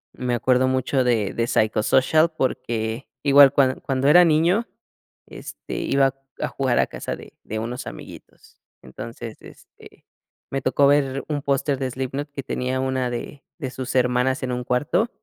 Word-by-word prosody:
Me 125 -1 -1
acuerdo 125 +2 +2
mucho 130 0 +1
de 115 -5 +1
de 115 0 -1
Psychosocial, 130 +10 +3
porque 120 -5 -3 0.2
igual 140 -1 +7
cuan 135 -2 +2
cuando 135 0 -1
era 175 +4 +8
niño, 170 +8 +2 0.6
este, - - -9
iba 135 -1 +2 0.3
a - - -1
jugar 130 -3 0
a - - +4
casa - - -5
de - - -14
de 110 - -5
unos 120 +3 -5
amiguitos. - - -12 0.2
Entonces, 115 - -8
este, - - -17 0.5
me 135 -1 -2
tocó 130 +2 +2
ver 140 -1 +2
un 145 -2 -2
póster 140 0 0
de 130 - -2
Slipknot 135 +3 -4
que 140 -2 -6
tenía 130 -1 -2
una 130 -1 -1
de 120 +4 -6 0.2
de 130 -4 -4
sus 130 0 -5
hermanas 125 +1 +1
en 125 - -2
un 125 0 -3
cuarto. 145 - +1
130 Hz, 160 wpm, -23 LUFS, 125-140 Hz, 0.6 s, era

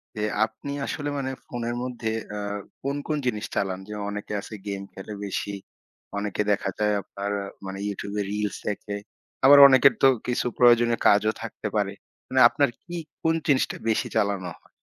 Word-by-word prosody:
যে 105 - -2 0.2
আপনি 110 +6 -8
আসলে 145 -1 -3
মানে 130 -1 -2
ফোনের 120 0 -3
মধ্যে, 120 -3 -3 0.3
আ - - -3 0.4
কোন, 140 +1 -2
কোন 155 - 0
জিনিস 105 -3 -1
চালান? 95 -1 -1
যেমন 105 -1 -5
অনেকে 105 +1 -5
আছে 110 - -10
game 100 -1 -4
খেলে 95 +2 -8
বেশি। 100 0 -3 0.6
অনেকে 105 0 -1
দেখা 100 -1 0
যায় 105 0 +2
আপনার 100 +1 -5 0.3
মানে 95 0 -5
YouTube-এ 100 +1 -3
reels 105 -1 -2
দেখে। 105 0 -3 0.5
আবার 145 +1 +9
অনেকের 135 0 +6
তো - - +9 0.2
কিছু 125 0 0
প্রয়োজনীয় 120 -1 +5
কাজও 105 +2 +4
থাকতে - - -5
পারে। - - +1 0.3
মানে 130 - +1
আপনার 140 +1 +2
কি 175 - -8 0.3
কোন 160 0 +3
জিনিসটা 140 -3 +2
বেশি 110 - +1
চালানো 100 -4 0
হয়? - - -27
105 Hz, 165 wpm, -25 LUFS, 100-125 Hz, 0.6 s, আবার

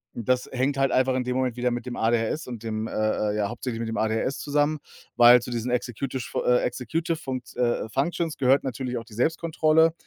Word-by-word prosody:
das 125 +2 0
hängt 135 +2 0
halt 135 -1 +2
einfach 130 0 +2
in 130 - 0
dem 125 0 -2
Moment 130 -2 0
wieder 125 0 +1
mit 120 0 -4
dem 120 - -4
ADHS 115 +6 0
und 120 -4 -7
dem, 110 -1 -3
äh, - - -8
äh 105 -1 0
ja 100 -1 0
hauptsächlich 120 -1 -5
mit 115 -1 -3
dem 115 - -3
ADHS 110 +5 0
zusammen, 145 +1 +1 0.4
weil 120 +1 +8
zu 120 - -7
diesen 120 +1 -2
Executish 125 +1 -3
fu - - -2
äh, 125 - +4
Executive 160 +7 -2
Funkt 130 -5 -6
äh, 120 -3 0
äh, - - -11
Functions 160 +5 -1
gehört 135 +1 +3
natürlich 125 -1 -3
auch 115 - -10
die 110 - -14
Selbstkontrolle 160 +3 +2
125 Hz, 220 wpm, -25 LUFS, 115-135 Hz, 0.4 s, weil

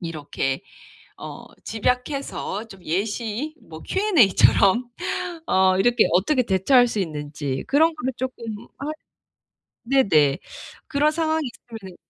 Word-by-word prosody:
이렇게 150 -2 -3 0.6
어 - - -9 0.2
집약해서 250 -2 -2
좀 195 -3 -13
예시 220 - -2
뭐 160 0 -11
Q&A처럼 245 - +4 0.6
어 190 0 +3
이렇게 240 +2 +4
어떻게 250 - +3
대처할 240 +6 +4
수 215 - -3
있는지 145 -5 -4
그런 320 +3 +3
거를 260 -3 -2
쪼끔 255 -2 -5 0.3
할 280 +4 -4 0.9
네네. 175 - +3 0.5
그런 300 0 +2
상황이 315 -1 0 0.3
있으면은 190 -5 -9
225 Hz, 240 characters per minute, -23 LUFS, 185-275 Hz, 0.9 s, Q&A처럼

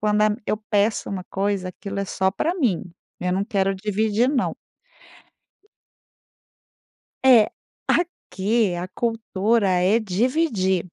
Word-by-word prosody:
quando, 210 0 +2
a 215 0 +3
eu 215 - +1
peço 210 +1 +1
uma 185 -2 -4
coisa, 195 -1 -1
aquilo 200 +2 -7
é 200 - -1
só 190 0 0
pra 320 - -1
mim, 240 - +1 0.4
eu 180 0 0
não 195 +2 0
quero 195 -3 0
dividir 215 +4 +1
não. 275 -4 0 2.7
É, 240 -5 +7 0.4
aqui 215 - 0
a 175 +1 -4
cultura 225 -2 0
é 185 +5 +3
dividir, 210 - +1
205 Hz, 120 wpm, -23 LUFS, 190-230 Hz, 2.7 s, É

